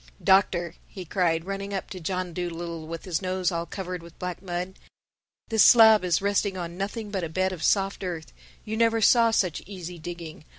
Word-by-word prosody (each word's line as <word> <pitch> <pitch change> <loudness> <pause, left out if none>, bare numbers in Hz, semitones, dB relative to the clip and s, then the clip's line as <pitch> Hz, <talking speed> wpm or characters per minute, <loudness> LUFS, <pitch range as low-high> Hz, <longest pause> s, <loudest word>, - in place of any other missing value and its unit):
"Doctor," 180 -3 +3
he 185 -3 -9
cried, 165 -2 0
running 195 +1 -4
up 190 - -5
to 185 - -6
John 180 +1 -3
Dolittle 170 -2 -5
with 165 0 -7
his 180 -2 -1
nose 185 0 -1
all 170 0 -3
covered 185 -2 -5
with 170 0 -14
black 180 -1 -5
mud, 180 0 -5 0.7
"this 220 -2 +3
slab 220 -3 +8
is 180 +1 +1
resting 200 -1 +1
on 170 -1 -5
nothing 205 +3 -4
but 190 -3 -2
a 165 - -3
bed 185 +3 0
of 175 - -8
soft 195 +3 +1
earth. 170 -3 -5 0.3
You 220 0 -3
never 230 0 +3
saw 230 +1 +5
such 185 -7 0
easy 180 -3 -8
digging. 165 -1 -8
185 Hz, 195 wpm, -26 LUFS, 170-200 Hz, 0.7 s, slab